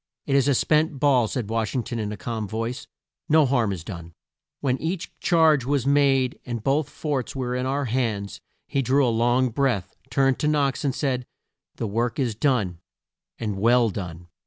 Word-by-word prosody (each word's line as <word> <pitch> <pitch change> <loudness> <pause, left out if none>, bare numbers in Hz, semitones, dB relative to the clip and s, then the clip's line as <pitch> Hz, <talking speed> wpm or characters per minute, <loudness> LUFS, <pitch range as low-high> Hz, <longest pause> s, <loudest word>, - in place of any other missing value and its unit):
"It 140 - 0
is 140 0 +3
a 140 - +3
spent 155 +1 +2
ball," 130 -5 +4
said 120 -1 -3
Wash 115 +2 -2
ing 125 - 0
ton 120 - -4
in 105 -1 -3
a 105 - -5
calm 110 +3 -4
voice; 115 +4 -4 0.4
"no 155 -1 +5
harm 120 -6 +1
is 90 -4 -5
done." 85 -2 -9 0.4
When 130 -2 0
each 165 +2 -3
charge 160 -5 +4
was 135 0 0
made 135 -2 +3
and 120 -3 -5
both 140 +3 +1
forts 140 -6 -3
were 125 -2 -2
in 125 +1 -1
our 140 +1 -1
hands, 110 -5 -2 0.3
he 140 - 0
drew 135 +2 +3
a - - +2
long 120 +3 +2
breath, 120 -6 -1
turned 135 -2 +2
to 150 - 0
Knox 145 -2 +1
and 135 -3 0
said, 125 -4 -1 0.5
"The - - -3
work 115 +7 -1
is 125 -5 0
done 105 - 0 0.6
and 105 -4 -3
well 120 +1 +4
done!" 90 -3 -7
125 Hz, 190 wpm, -24 LUFS, 110-140 Hz, 0.6 s, no